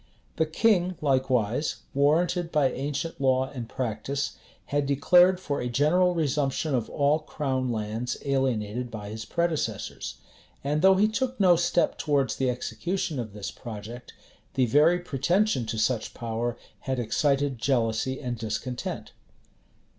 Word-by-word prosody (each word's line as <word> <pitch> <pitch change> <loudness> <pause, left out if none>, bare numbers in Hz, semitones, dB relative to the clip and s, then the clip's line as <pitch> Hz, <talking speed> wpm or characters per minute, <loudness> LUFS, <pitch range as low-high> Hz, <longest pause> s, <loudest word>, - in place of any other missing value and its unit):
[*] - - -37
The 160 - +2
king 180 0 +2
likewise, 130 -2 +1 0.2
warranted 165 +5 +2
by 145 -4 +3
ancient 145 +3 -4
law 130 0 +2
and 120 -5 -6
practice, 130 +4 -3 0.3
had 145 -1 0
declared 175 +6 +5
for 145 -6 -3
a 125 - -2
general 170 +8 +3
resumption 150 -1 0
of 120 -4 0
all 145 +2 +2
crown 130 -5 -2
lands 110 +2 -3
alienated 125 -4 0
by 105 -2 -7
his 110 +1 -6
predecessors; 170 -3 -2 0.5
and 145 +2 0
though 190 +1 +7
he 205 +3 +4
took 255 +3 -2
no 185 -3 +6
step 170 0 +1
towards 140 -4 +1
the 130 -1 +1
execution 165 +5 -2
of 110 -4 -5
this 105 -2 -5
project, 115 +1 -9 0.4
the 130 - +3
very 150 +8 +4
pretension 175 - +1
to 110 0 -3
such 110 +1 0
power 115 +1 -3 0.3
had 130 - +1
excited 135 +2 +1
jealousy 125 +1 0
and 125 -4 -4
discontent. 115 +3 -4
135 Hz, 140 wpm, -27 LUFS, 120-160 Hz, 0.5 s, though